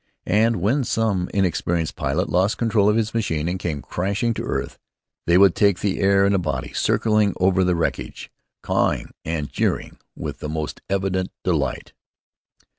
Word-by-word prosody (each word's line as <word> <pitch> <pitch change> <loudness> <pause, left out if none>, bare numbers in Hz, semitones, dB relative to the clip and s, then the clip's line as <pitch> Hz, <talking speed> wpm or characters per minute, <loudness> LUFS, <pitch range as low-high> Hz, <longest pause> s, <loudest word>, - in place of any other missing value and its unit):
And 115 +2 +3
when 110 +10 +1
some 110 -6 0
inexperienced 85 -4 0
pilot 75 +8 -1
lost 95 +5 +1
control 110 -3 +2
of 105 - +3
his 115 -1 0
machine 80 -9 -1
and 90 +1 -2
came 75 -6 -3
crashing 100 +6 -1
to - - -4
earth, - - -3 0.5
they 85 +1 +5
would 95 -2 +6
take 100 -3 +3
the 100 -2 -1
air 100 0 +4
in 100 - +3
a 100 - +2
body, 90 - -3
circling 105 -2 +2
over 95 0 +3
the 90 -1 +2
wreckage, 85 - -3 0.3
cawing - - 0
and 80 -2 -3
jeering - - -2 0.2
with - - -6
the 75 - -5
most 75 -1 -4
evident 95 -1 -1
delight. - - -1
95 Hz, 165 wpm, -22 LUFS, 85-105 Hz, 0.5 s, would